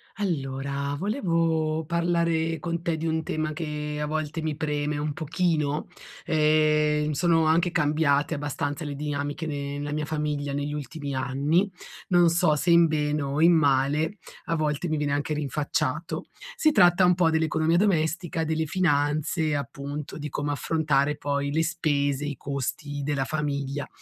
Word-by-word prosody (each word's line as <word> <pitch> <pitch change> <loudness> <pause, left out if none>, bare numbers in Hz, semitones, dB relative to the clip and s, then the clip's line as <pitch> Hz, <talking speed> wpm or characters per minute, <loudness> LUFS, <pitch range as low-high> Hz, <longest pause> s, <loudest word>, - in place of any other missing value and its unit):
Allora, 140 -6 -2
volevo 165 - 0
parlare 170 -1 +1
con 170 +2 -3
te 165 -1 -1
di 160 - -4
un 160 0 0
tema 155 0 -2
che 150 -1 -4
a 150 - -1
volte 155 +1 -3
mi 155 -1 -2
preme 150 -1 -2
un 150 0 -2
pochino. 155 -2 -1 0.4
Ehm, 150 -1 +3
sono 165 +2 +2
anche 165 +2 +3
cambiate 150 -1 +2
abbastanza 145 0 -3
le 145 -2 -4
dinamiche 145 +1 -3
ne 145 -2 -4
nella 145 0 -4
mia 150 0 -2
famiglia 150 -2 -2
negli 145 +1 -2
ultimi 145 -1 -5
anni, 140 +9 +1 0.4
non 175 -2 +5
so 165 -2 +3
se 165 +4 +1
in 170 0 +7
bene 150 -1 0
o 140 +2 -1
in 170 +2 +7
male, 145 +4 +2 0.3
a 165 - 0
volte 155 +1 -1
mi 155 - 0
viene 145 -1 0
anche 145 +2 -1
rinfacciato. 145 0 -2 0.3
Si 310 -10 +3
tratta 180 -7 +5
un 180 - +5
po' 175 -2 +3
dell'economia 160 +1 +2
domestica, 170 -3 +1
delle 160 0 0
finanze, 155 -2 +1
appunto, 140 +1 -5
di 150 0 -5
come 145 +1 -2
affrontare 150 -1 +1
poi 140 -1 -1
le 160 +2 +2
spese, 145 -4 0
i 145 -1 -4
costi 145 +1 -4
della 140 -2 -1
famiglia, 140 -1 -2
150 Hz, 155 wpm, -26 LUFS, 145-160 Hz, 0.4 s, in